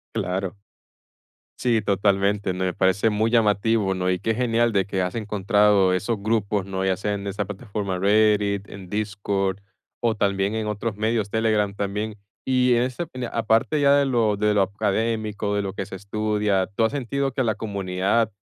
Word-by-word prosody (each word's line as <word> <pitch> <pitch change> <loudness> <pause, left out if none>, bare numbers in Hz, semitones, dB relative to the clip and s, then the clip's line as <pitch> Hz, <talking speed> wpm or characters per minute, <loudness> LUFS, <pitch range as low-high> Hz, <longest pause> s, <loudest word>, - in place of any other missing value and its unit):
Claro. 95 +2 -2 1.0
Sí, 115 -3 +1
totalmente, 100 -1 +1
me 90 -1 -1
parece 95 +3 +2
muy 110 +2 0
llamativo, 105 -2 +2
¿no? 90 0 -1
Y 90 -1 0
qué 115 +2 0
genial 120 -1 +2
de 95 -2 +1
que 95 -2 -2
has 90 +3 -2
encontrado 105 -2 +2
esos 105 +4 -1
grupos, 105 -2 0
¿no? 95 -1 -3
Ya 95 -1 +2
sea 105 +3 -2
en 100 0 -6
esa 100 +1 -2
plataforma 100 -2 -4
Reddit, 105 0 +2
en 95 -2 -10
Discord 100 -2 -1 0.4
o 115 -2 +1
también 100 +1 0
en 110 -1 -2
otros 105 0 -3
medios, 110 -1 0
Telegram 110 -2 +1
también. 105 +2 -3 0.3
Y 125 -1 +3
ese 125 +7 -1
de 125 -2 -4
aparte 115 +6 +1
ya 140 0 +5
de 140 -1 +3
lo 115 -6 +1
de 105 0 +2
lo 105 - +3
académico, 105 +1 -1
de 100 - +1
lo 95 -1 -4
que 95 - -4
se 95 - -8
estudia, 105 -1 0
¿tú 115 - +3
has - - 0
sentido 140 0 -2
que 130 - 0
la 110 -2 0
comunidad 100 +2 -1
105 Hz, 175 wpm, -23 LUFS, 100-110 Hz, 1.0 s, ya